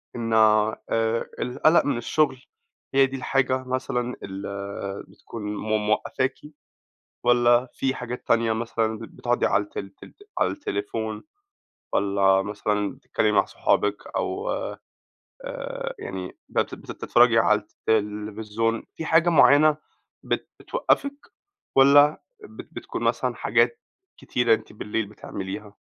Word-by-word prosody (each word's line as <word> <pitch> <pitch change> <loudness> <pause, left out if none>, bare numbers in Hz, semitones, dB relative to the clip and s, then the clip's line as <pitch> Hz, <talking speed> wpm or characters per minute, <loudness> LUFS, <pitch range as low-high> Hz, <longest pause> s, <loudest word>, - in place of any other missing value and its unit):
إن 115 -1 -2
آآ، 110 0 +4 0.6
القَلَق 155 +7 +3
من 140 -4 0
الشغل 135 +3 +1 0.6
هي 135 0 +6
دي 135 0 -5
الحاجة 130 0 0
مثلًا 125 -1 -2
ال 95 0 -6 0.6
بتكون 105 +3 -10
م 105 0 -1
موقّفاكِ، 130 +4 0 0.9
والَّا 120 +1 +4
فيه 135 0 -1
حاجات 125 0 -6
تانية 115 -1 +3
مثلًا 110 -1 -1
ب - - -10
بتقعدي 120 +2 -1
على 100 +1 +2
الت 105 - -9
تل 100 -1 -9 0.2
على - - +2
التليفون 110 - -4 0.7
والَّا 100 -1 +3
مثلًا 105 0 -1
بتتكلمي 105 - 0
مع - - +4
صحابِك 105 0 +1 0.2
أو - - -2
آآ، - - -4 1.2
يعني 90 -1 -6
بت - - -1
بتتفرّجي 120 -1 +2
على 105 -1 +4
التلفزيون، 105 +1 -2
فيه 160 - -5
حاجة 165 +2 +4
معيّنة 150 -1 +6 0.5
بت - - -2
بتوقّفِك، 285 - -1 0.5
والَّا 145 +2 +6 0.2
بت - - -11
بتكون - - -6
مثلًا - - 0
حاجات 460 - +1 0.4
كتيرة 120 -2 +2
أنتِ - - -7
بالليل 105 +1 -3
بتعمليها؟ 100 0 -7
115 Hz, 120 wpm, -25 LUFS, 105-130 Hz, 1.2 s, هي